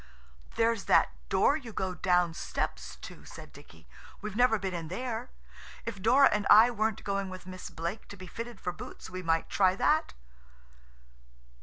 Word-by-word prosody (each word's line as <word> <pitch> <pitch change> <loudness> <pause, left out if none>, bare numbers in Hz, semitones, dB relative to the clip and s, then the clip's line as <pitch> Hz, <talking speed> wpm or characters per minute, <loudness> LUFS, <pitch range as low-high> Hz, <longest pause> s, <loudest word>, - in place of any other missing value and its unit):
"There's 230 -2 +1
that - - +4 0.2
door 285 - +3
you 255 -7 -7
go 190 -3 -2
down 180 -1 +2
steps 65 - -4
to," - - -10
said - - -12
Dicky; - - -16 0.3
"we've 210 -1 -6
never 245 -1 +4
been 190 -2 -4
in 165 -2 -4
there. 235 +6 -4 0.6
If 210 -4 -5
Dora 260 +6 +6
and 210 -1 0
I 220 +4 +8
weren't 220 -2 -1
going 195 -1 -2
with 185 -1 -9
Miss 185 0 -8
Blake 170 +6 -5
to 200 - -10
be 185 - -9
fitted 230 +3 -7
for 180 - -3
boots 175 - -10
we 185 0 -5
might 165 -2 0
try 185 -2 +3
that." 305 +10 +1
195 Hz, 170 wpm, -30 LUFS, 185-230 Hz, 0.6 s, I